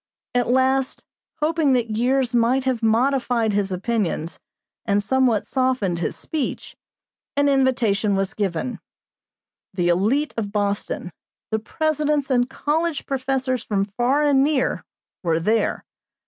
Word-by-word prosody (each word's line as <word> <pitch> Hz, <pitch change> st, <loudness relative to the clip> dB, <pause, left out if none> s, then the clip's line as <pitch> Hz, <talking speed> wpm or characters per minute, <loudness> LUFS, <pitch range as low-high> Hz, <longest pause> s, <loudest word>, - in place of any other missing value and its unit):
At 245 Hz, -1 st, +1 dB
last, 260 Hz, +1 st, +1 dB, 0.4 s
hoping 310 Hz, -2 st, +2 dB
that 235 Hz, -3 st, 0 dB
years 250 Hz, +2 st, +1 dB
might 240 Hz, +3 st, +3 dB
have 255 Hz, -3 st, -1 dB
modified 235 Hz, -1 st, +2 dB
his 200 Hz, -1 st, 0 dB
opinions 185 Hz, -4 st, -2 dB, 0.4 s
and 205 Hz, 0 st, +1 dB
somewhat 250 Hz, -1 st, +2 dB
softened 255 Hz, -10 st, 0 dB
his 170 Hz, -, -2 dB
speech, 305 Hz, -5 st, -4 dB, 0.6 s
an 285 Hz, 0 st, +3 dB
invitation 240 Hz, -7 st, +2 dB
was 195 Hz, +1 st, -1 dB
given. 200 Hz, +4 st, -2 dB, 1.0 s
The 175 Hz, -2 st, +1 dB
élite 220 Hz, -, +1 dB
of 205 Hz, -3 st, -2 dB
Boston, 200 Hz, -3 st, -2 dB, 0.4 s
the 220 Hz, -, +1 dB
presidents 300 Hz, +2 st, -1 dB
and 245 Hz, 0 st, +2 dB
college 310 Hz, +3 st, -1 dB
professors 260 Hz, -2 st, -1 dB
from 200 Hz, -2 st, 0 dB
far 245 Hz, +8 st, +1 dB
and 280 Hz, -2 st, +4 dB
near, 290 Hz, -2 st, 0 dB, 0.4 s
were 165 Hz, -3 st, +1 dB
there. 215 Hz, +5 st, 0 dB
245 Hz, 125 wpm, -22 LUFS, 205-270 Hz, 1.0 s, and